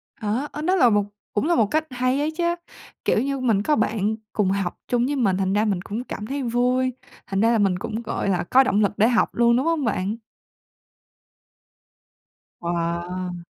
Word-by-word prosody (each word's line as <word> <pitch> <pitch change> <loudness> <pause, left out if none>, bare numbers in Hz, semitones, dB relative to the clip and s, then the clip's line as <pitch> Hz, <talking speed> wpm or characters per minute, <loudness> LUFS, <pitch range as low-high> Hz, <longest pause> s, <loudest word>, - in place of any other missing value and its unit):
À, 240 +3 -2
ơ, 300 - -6
đó 365 +5 +2
là 250 -10 +5
một 205 -1 +3 0.3
cũng 210 - 0
là 345 - +3
một 220 - +4
cách 310 +9 0
hay 255 +2 0
ấy 300 +2 0
chứ, 345 +2 -3 0.6
kiểu - - +3
như 275 0 -2
mình 225 -6 +2
có 300 - +2
bạn 220 -2 0 0.2
cùng 200 -3 +1
học 195 -3 -2
chung 245 0 +1
với 285 - -1
mình, 200 -8 +1
thành 190 0 0
ra 210 +1 +2
mình 195 -4 0
cũng 220 +6 -5
cảm 210 -4 -6
thấy 280 0 -3
vui, 250 +2 +1 0.3
thành 195 +1 -1
ra 230 - +4
là 235 - +3
mình 195 -4 +2
cũng, 220 +4 -4
gọi 220 -3 -2
là, 185 -2 +1
có 260 +9 +5
động 215 -5 +1
lực 200 - +2
để 220 - +5
học 235 -1 +1
luôn, 235 0 +4
đúng 260 - 0
hông 325 -5 +1
bạn? 200 -1 -1 2.5
Wow. 175 +1 -3
225 Hz, 205 wpm, -23 LUFS, 195-255 Hz, 2.5 s, là